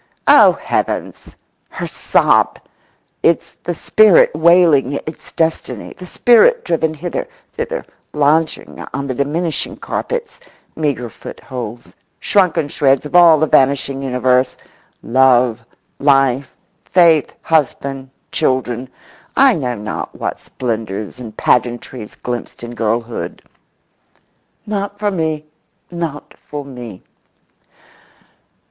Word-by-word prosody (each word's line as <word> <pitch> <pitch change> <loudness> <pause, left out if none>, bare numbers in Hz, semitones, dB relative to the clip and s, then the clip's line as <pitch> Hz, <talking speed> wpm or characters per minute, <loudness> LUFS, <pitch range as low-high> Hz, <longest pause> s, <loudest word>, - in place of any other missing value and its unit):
Oh, - - +7
heavens, - - -3 0.3
her - - -5
sob! - - +2 0.6
It's 165 - +1
the 175 - -2
spirit 215 +2 +5
wailing 160 -4 +4
its 155 +3 -7
destiny, 160 0 -2
the 180 - -10
spirit 355 - +4
driven 160 -1 0
hither, 175 - -4 0.3
thither, - - -4 0.3
lodging 150 +2 0
on 140 0 -3
the 130 - -3
diminishing 155 +5 -2
carpets—meagre 160 - -5
footholds—shrunken 140 - -3
shreds 135 -1 +2
of 150 - -6
all 170 -3 +8
the 155 - +3
vanishing 135 -1 +2
universe—love, 125 -1 +1 0.4
life, 135 -1 +2 0.3
faith, 165 -5 +4
husband, 140 -3 -1 0.2
children, 130 -1 -1 0.5
I 270 -1 +6
know 125 - -2
not 105 0 -6
what - - -4
splendours 110 -3 -5
and 110 -3 -9
pageantries 120 -2 -1
glimpsed 120 -1 -6
in 120 0 -7
girlhood. 115 +1 -3 1.2
"Not 205 -1 -3
for 205 0 -1
me—not 160 -1 -6
for 145 -1 -7
me." 120 -8 -10
140 Hz, 95 wpm, -17 LUFS, 125-165 Hz, 1.2 s, all